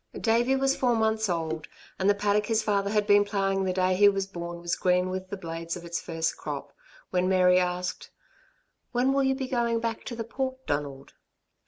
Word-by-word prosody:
Davey 240 +3 +2
was 270 0 +2
four 245 -2 +2
months 220 -1 +1
old, 160 -2 -2 0.3
and 190 +1 +2
the 205 - +4
paddock 205 +1 +1
his 225 -1 +1
father 200 -1 +1
had 210 0 +1
been 205 0 +5
ploughing 195 -1 0
the 185 - +1
day 185 0 +1
he 205 +2 +6
was 195 -1 -1
born 175 -2 -7
was 170 0 -1
green 180 0 +1
with 185 0 -5
the 200 - -5
blades 165 -1 -5
of 170 - -10
its 170 0 -3
first 165 -1 -2
crop, - - -6 0.4
when 180 0 +1
Mary 180 -1 +5
asked: 180 0 -2 0.8
"When 250 +2 +2
will 275 0 +2
you 265 0 +2
be 265 -1 -4
going 235 -2 0
back 230 -1 -3
to 240 - -5
the 230 - -3
Port, 260 +2 -4
Donald?" 140 -2 -4
195 Hz, 205 wpm, -27 LUFS, 180-230 Hz, 0.8 s, he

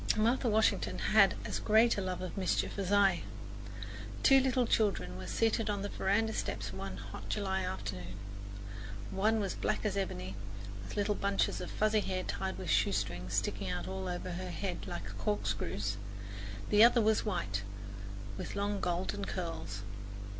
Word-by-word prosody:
Martha 235 +3 +3
Washington 115 - +3
had 200 - +5
as - - -2
great 225 +2 +5
a 200 - -1
love 185 -1 -2
of 185 - -5
mischief 195 +1 0
as 195 -1 -1
I. 195 -3 +5 1.0
Two 270 - +8
little 255 -1 +3
children 105 - +1
were 95 0 -6
seated 220 - +2
on 200 -1 0
the 205 - -2
veranda 220 +3 +1
steps 105 - -2
one 95 0 -5
hot 85 - -8
July 190 -2 0
afternoon. 95 -2 -4 1.0
One 215 +3 +3
was 195 -3 -1
black - - -1
as 205 -2 +1
ebony, 95 - -2 0.5
with 95 - -7
little 205 0 +2
bunches 200 -1 +1
of - - -4
fuzzy 215 0 +3
hair 185 -2 -1
tied 190 +1 -2
with 180 -4 -2
shoestrings 95 -2 +1
sticking 100 -1 0
out 90 0 -2
all 95 0 -3
over 180 +1 -3
her 180 +1 -4
head 180 0 -3
like 105 - -5
corkscrews. 105 0 -1 0.7
The 210 +1 +8
other 235 +1 +7
was 220 -1 +4
white, 170 - -1 0.8
with - - -5
long 200 0 0
golden 170 - -1
curls. 105 - -4
185 Hz, 160 wpm, -33 LUFS, -, 1.0 s, Two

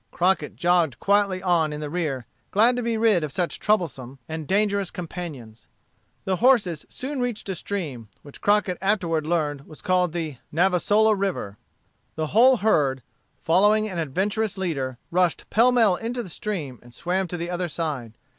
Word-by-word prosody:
Crockett 185 +2 0
jogged 175 -5 +2
quietly 200 -2 +2
on 170 -4 +2
in 150 - -5
the 150 - -4
rear, 145 -6 -2 0.2
glad 230 +5 +4
to 245 - -1
be 230 -1 -1
rid 220 -7 +3
of 150 - -3
such 175 +2 -2
troublesome 140 - -1
and 160 -2 -5
dangerous 200 0 +1
companions. 155 -10 -8 0.6
The 190 -1 0
horses 220 - +2
soon 270 +1 -5
reached 245 -5 -3
a - - 0
stream, 155 - -5
which 145 - -12
Crockett 205 -3 +2
afterward 175 -6 0
learned 150 -4 -1
was 155 - -12
called 180 -2 +2
the 160 -5 -4
Navasola 195 +6 +3
River. 190 - -3 0.6
The 155 0 -2
whole 250 +4 +6
herd, 140 - +1 0.3
following 210 +6 +3
an 185 -5 -4
adventurous 200 +7 -1
leader, 140 -9 -2
rushed 180 -1 +1
pell 235 +3 +5
mell 225 -7 +4
into 240 +2 -3
the 190 - -10
stream 155 - -4
and 120 0 -15
swam 185 +2 -1
to 175 - -5
the 170 +1 -4
other 180 0 -2
side. 145 -9 -4
180 Hz, 165 wpm, -24 LUFS, 155-205 Hz, 0.6 s, whole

